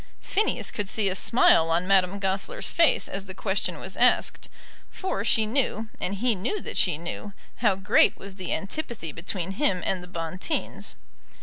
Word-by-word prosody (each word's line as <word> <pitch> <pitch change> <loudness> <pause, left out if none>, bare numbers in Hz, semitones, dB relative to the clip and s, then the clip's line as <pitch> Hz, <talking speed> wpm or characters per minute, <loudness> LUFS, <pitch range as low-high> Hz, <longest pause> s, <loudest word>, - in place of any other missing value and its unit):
Phineas 420 +2 0
could 205 -3 -3
see 205 -2 +1
a 185 - -2
smile 185 -6 +4
on 170 +2 +1
Madame 190 0 +3
Goesler's 195 - -2
face 335 -2 +3
as 195 0 -4
the 190 -1 -8
question 190 -3 -2
was 190 - -6
asked; 250 +1 +2 0.4
for 375 - -3
she 220 0 +3
knew, 225 -2 0
and 195 - -2
he 235 +4 +1
knew 225 - -2
that - - -7
she 175 -5 +2
knew, 175 +5 -6 0.2
how 210 -5 +2
great 200 +4 +3
was 195 0 -9
the 185 -3 -5
antipathy 200 - -4
between 175 +3 -4
him 195 -4 +1
and 185 -2 0
the 180 - -10
Bonteens. 180 - -4
195 Hz, 175 wpm, -26 LUFS, 185-230 Hz, 0.4 s, smile